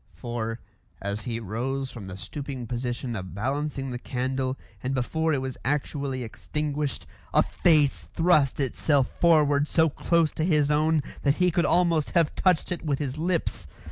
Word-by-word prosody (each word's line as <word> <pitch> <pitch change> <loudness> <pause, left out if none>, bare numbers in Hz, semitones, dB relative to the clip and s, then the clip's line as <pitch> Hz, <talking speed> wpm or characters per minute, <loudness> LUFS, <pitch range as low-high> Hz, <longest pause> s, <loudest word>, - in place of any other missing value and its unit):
For, 120 -1 -4 0.4
as 100 +2 -3
he 115 -2 -2
rose 125 +6 -3
from 105 -5 -8
the 95 0 -7
stooping 130 +6 -6
position 120 0 -3
of 95 -2 -6
balancing 135 +4 -2
the 125 - -4
candle, 130 +1 -2 0.2
and 130 +1 -1
before 160 +6 0
it 140 -3 +1
was 130 -1 -5
actually 140 -1 -1
extinguished, 145 +4 -3 0.3
a - - +6
face 150 -5 +2
thrust 155 -6 +3
itself 135 0 +2
forward 150 -4 +4
so 160 0 +3
close 165 +2 +2
to 155 - -2
his 150 -4 +3
own 155 0 +3 0.2
that 140 0 +3
he 180 0 +3
could 170 +1 +2
almost 170 -4 +3
have 165 -3 +3
touched 185 -2 +2
it 175 - -3
with 145 -4 0
his 140 0 -4
lips. 170 0 -1
140 Hz, 165 wpm, -26 LUFS, 125-155 Hz, 0.4 s, a